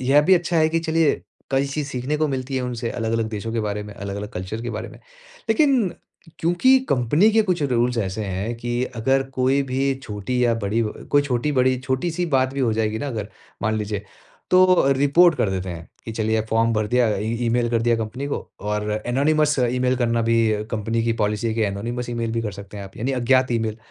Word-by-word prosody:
यह 135 +3 +5
भी 185 +4 +5
अच्छा 175 -1 0
है 155 0 +4
कि 165 +1 0
चलिए, 160 -1 +1 0.3
कई 135 +1 +2
चीज़ 140 +1 -3
सीखने 130 +3 -2
को 155 0 +1
मिलती 135 0 -3
हैं 130 - -1
उनसे 120 -2 -3
अलग-अलग 115 -1 -1
देशों 110 +1 -5
के 115 - 0
बारे 105 -1 -2
में, 105 0 -9
अलग-अलग 100 +1 -5
कल्चर 95 +5 -5
के 120 - -3
बारे 110 -1 -5
में। - - -13 0.5
लेकिन 250 -2 +3 0.5
क्योंकि 180 +11 +4
कंपनी 145 - +3
के 220 0 +4
कुछ 180 -6 0
रूल्स 125 -2 +1
ऐसे 100 +1 -2
हैं 100 +5 -3
कि 120 +1 -2
अगर 135 +4 +2
कोई 130 +2 +2
भी 135 +1 0
छोटी 110 +4 -2
या 115 -1 +3
बड़ी 110 +3 +1
व 105 - -2
अ, - - -12
कोई 145 0 +4
छोटी-बड़ी 130 -1 +1
छोटी-सी 160 +7 -1
बात 130 +1 +1
भी 140 - -2
हो 115 -4 +2
जाएगी 110 0 -1
ना, 145 - -3
अगर 110 -4 -4 0.3
मान 110 0 +1
लीजिए, 105 -1 -3 0.5
तो 185 0 +7 0.3
रिपोर्ट 155 +5 +5
कर 100 - +1
देते 95 -1 -3
हैं 85 -1 -7 0.2
कि 115 - -5
चलिए 110 0 0
फ़ॉर्म 115 +1 +2
भर 110 -1 0
दिया 125 0 +3
अ, - - -2
ई 110 +2 -2
ईमेल 120 0 +1
कर 115 -1 +1
दिया 115 0 +3
कंपनी 115 +5 -4
को 145 - -2 0.2
और 105 +1 -2 0.2
एनोनिमस 150 +3 +2
ईमेल 125 +1 +1
करना 115 -2 +1
भी 115 0 +2 0.3
कंपनी 115 +1 -1
की 115 - +2
पॉलिसी 105 +2 0
है 110 - -1
कि 115 - 0
एनोनिमस 120 +5 -3
ईमेल 115 -1 -2
भी 115 0 -1
कर 105 -3 -3
सकते 100 +1 -10
हैं 100 - -6
आप, 95 - -13
यानी 130 +5 -2
अज्ञात 130 +1 +2
ईमेल। 110 -2 -1
120 Hz, 220 wpm, -22 LUFS, 110-140 Hz, 0.5 s, तो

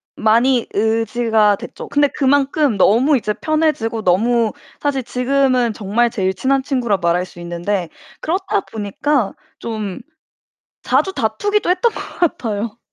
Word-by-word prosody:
많이 235 +3 +3
의지가 220 -1 +2
됐죠. - - -9
근데 290 0 +3
그만큼 280 -2 +1
너무 250 +10 +4
이제 215 -3 -2
편해지고 305 -9 -1
너무 225 +5 +2 0.3
사실 275 -3 -1
지금은 250 -1 +1
정말 215 +4 0
제일 190 -5 -1
친한 270 +5 0
친구라 250 -7 0
말할 175 +1 +1
수 175 - -15
있는데 175 +1 -3 0.3
그렇다 365 - -1
보니까 220 +3 -1 0.3
좀 215 -4 -5 0.8
자주 290 +9 +1
다투기도 415 0 0
했던 380 +6 +2
것 - - -7 0.2
같아요. 225 -9 -1
235 Hz, 285 characters per minute, -18 LUFS, 210-275 Hz, 0.8 s, 너무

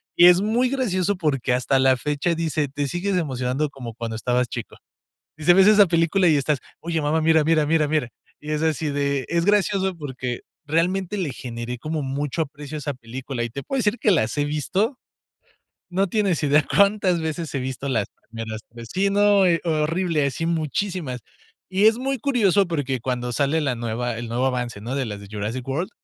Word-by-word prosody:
Y 175 - +7
es 180 +1 +6
muy 235 +5 +1
gracioso 205 -8 0
porque 140 -7 0
hasta 130 +2 +2
la 130 0 +5
fecha 150 +5 -1
dice: 160 -2 -1
"Te 140 +1 -3
sigues 180 +6 -1
emocionando 135 -2 -1
como 125 -4 -8
cuando 115 -1 -4
estabas 125 +2 0
chico". 115 -2 -7 0.6
Dice: 155 +3 +4
"Ves 190 +1 +6
esa 210 -1 +7
película 170 +2 +2
y 155 - +4
estás: 145 +1 +1 0.2
'Oye, 165 -1 -2
mamá, 150 +2 +1
mira, 160 0 +4
mira, 160 -1 +3
mira, 155 0 +2
mira'". 150 -5 0 0.3
Y 150 - -7
es 150 - 0
así 160 -1 0
de 140 -1 -1
Es 170 0 +1
gracioso 200 -2 +2
porque 130 -5 -5 0.3
realmente 180 +5 0
le 175 -8 -2
generé 120 0 -6
como 155 +4 -3
mucho 140 +3 -2
aprecio 150 0 -7
a - - -3
esa 145 0 -3
película 125 +1 -6
y - - -3
te 140 +4 -6
puedo 270 - -3
decir 230 -1 +1
que 215 - +2
las 115 -10 +1
he 145 - +2
visto, 185 - -1 0.9
no 190 +2 +1
tienes 195 -5 +1
idea 145 0 +4
cuántas 200 -3 +3
veces 160 0 -4
he 135 - 0
visto 130 +2 -4
las 110 -7 0 0.2
primeras 110 -1 -6
3 115 0 -11
Sí, 195 +2 +2
no, 205 -1 +4
eh, 170 -2 +3
horrible, 160 -1 +1
así 140 +4 -3
muchísimas. 165 -3 -2 0.5
Y 190 +2 +2
es 220 +1 +5
muy 270 +1 -1
curioso 205 -7 +3
porque 140 -6 -2
cuando 125 0 -2
sale 145 +5 +1
la 135 -4 0
nueva, 120 0 -3
el 120 0 -5
nuevo 120 +3 -1
avance, 125 -4 -2
¿no?, 120 +4 -4
de 135 -2 -1
las 105 -2 -5
de 100 - -12
"Jurassic 105 +4 -4
World", 160 +9 -2
150 Hz, 200 wpm, -23 LUFS, 130-180 Hz, 0.9 s, Y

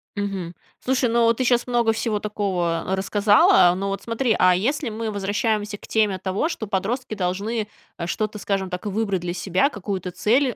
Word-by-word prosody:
Мгм. 195 -4 -4 0.3
Слушай, 255 -1 +1
но 230 0 +4
ты 255 - -2
щас 245 0 +2
много 235 -2 +2
всего 220 -2 -1
такого 185 -6 -1
рассказала. 200 -2 +5
Ну 195 +1 -3
вот 195 - -3
смотри, 230 0 0
а 180 0 +5
если 255 +6 -1
мы 220 0 -4
возвращаемся 205 +1 -1
к - - -14
теме 210 -4 +1
того, 190 - -1
что 220 - -5
подростки 215 +5 -2
должны, 205 +4 -2 0.3
э, 170 -1 -4
что-то, 215 +3 -2
скажем 195 -2 -2
так, 180 +3 -5
выбрать 200 -3 -1
для 175 0 -3
себя, 190 +9 +1
какую-то 190 - -4
цель, 240 +7 +1
205 Hz, 175 wpm, -23 LUFS, 190-230 Hz, 0.3 s, рассказала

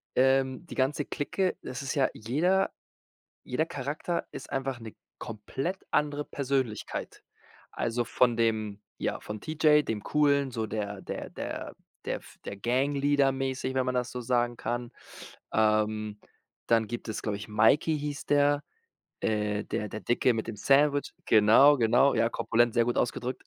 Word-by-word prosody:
ähm, 130 +3 +2
die - - -8
ganze 140 +2 +1
Clique 185 +5 -1
das 130 - -5
ist 135 - -2
ja 135 -2 +3
jeder 175 - +1 0.7
jeder 155 +6 -1
Charakter 145 +5 -3
ist - - -8
einfach 135 -2 -2
'ne 110 -1 -9 0.2
komplett 135 - -4
andere 145 0 +1
Persönlichkeit. 135 -5 -3 0.5
Also 120 +1 -1
von 120 0 +2
dem, 110 -3 0 0.2
ja, - - -2
von 105 0 -7
T. 155 - -5
J., 150 -1 +5
dem 110 -2 -2
Coolen, 140 -3 +2
so 110 -2 -2
der 100 -2 -4
der - - -6
der - - -6 0.3
der - - -1
f - - -16
der 100 - -5
Gangleader 140 +4 +2
mäßig, 130 0 -2
wenn 130 -1 +1
man 130 0 -1
das 125 0 -1
so 125 - -5
sagen 120 0 +1
kann. 120 0 -3 0.6
Ähm, 110 -1 +1 0.5
dann 115 -2 +3
gibt 120 0 -6
es, 110 - -3
glaub 105 -2 -1
ich 105 - -7
Mikey 110 +9 +3
hieß 145 -1 -4
der, 145 0 +3 0.6
äh, 105 -1 0
der 105 - -3
der 110 - -6
Dicke 120 +1 +2
mit 110 - -3
dem 110 - -5
Sandwich. 145 +4 +3
Genau, 115 +7 +7
genau. 120 +4 +4
Ja, 115 0 +3
korpulent- 115 +1 +2
sehr 120 -1 +4
gut 120 - 0
ausgedrückt. 125 +1 -2
125 Hz, 160 wpm, -28 LUFS, 110-140 Hz, 0.7 s, Genau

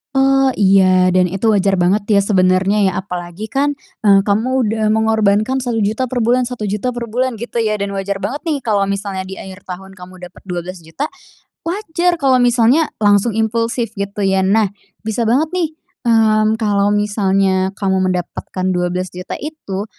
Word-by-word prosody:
Oh, 270 0 +4
iya 185 -2 +4
dan 180 -1 +3
itu 195 +5 -3
wajar 195 -1 +2
banget 180 +4 +2
ya 205 - +4
sebenarnya 195 0 +2
ya. - - -3
Apalagi 180 +1 -5
kan, 280 +4 -1 0.2
eee, 200 -3 +4
kamu 235 +5 +1
udah 220 +1 -1
mengorbankan 220 +3 +2
Rp1.000.000 230 +1 -1
per 255 - -3
bulan 245 +1 +2
Rp1.000.000 210 0 -3
per 240 -1 -4
bulan 245 +1 -2
gitu 235 +1 -3
ya 215 -1 0
dan 200 -1 -3
wajar 195 0 -2
banget 225 +9 -4
nih 315 -4 -1
kalau 200 -3 +1
misalnya 200 -1 -3
di 190 +1 -8
akhir 190 +1 -10
tahun 190 +1 -8
kamu 180 0 -11
dapet 180 - -15
Rp12.000.000, 175 - -5 0.6
wajar 355 -2 0
kalau 265 -5 +2
misalnya 245 +5 +3
langsung 205 +1 +2
impulsif 230 +1 -1
gitu 200 -1 -4
ya. 190 0 +2
Nah, 200 +1 +2 0.3
bisa 220 +1 -1
banget 295 +8 +1
nih, 360 -3 0 0.4
mmm, 220 -1 +3
kalau 205 -2 +1
misalnya 195 -2 +1
kamu 190 -2 0
mendapatkan 185 +1 -4
Rp12.000.000 180 0 -3
itu 255 -10 -6
210 Hz, 160 wpm, -17 LUFS, 190-235 Hz, 0.6 s, Oh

